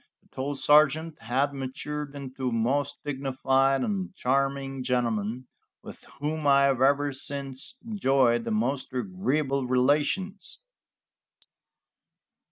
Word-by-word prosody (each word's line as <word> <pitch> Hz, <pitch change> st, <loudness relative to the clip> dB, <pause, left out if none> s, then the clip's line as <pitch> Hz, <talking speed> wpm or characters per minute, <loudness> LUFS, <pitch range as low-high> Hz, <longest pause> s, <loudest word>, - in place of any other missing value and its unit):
The -, -, -30 dB
tall 140 Hz, +2 st, -2 dB
sergeant 150 Hz, +3 st, +3 dB
had 130 Hz, +5 st, 0 dB
matured 145 Hz, +2 st, -5 dB
into 130 Hz, -2 st, -4 dB
a -, -, -6 dB
most 140 Hz, +5 st, 0 dB
dignified 135 Hz, -1 st, +1 dB
and 190 Hz, -2 st, -3 dB
charming 135 Hz, 0 st, 0 dB
gentleman, 120 Hz, -1 st, -1 dB, 0.4 s
with -, -, -11 dB, 0.2 s
whom 150 Hz, +1 st, -2 dB
I 140 Hz, 0 st, +6 dB
have 135 Hz, -2 st, +2 dB
ever 140 Hz, +1 st, +3 dB
since 135 Hz, -, -5 dB
enjoyed 135 Hz, -, +2 dB
the -, -, -4 dB
most 125 Hz, +5 st, -1 dB
agreeable 140 Hz, -3 st, -1 dB
relations. 150 Hz, +10 st, +1 dB
135 Hz, 110 wpm, -27 LUFS, 130-145 Hz, 0.4 s, I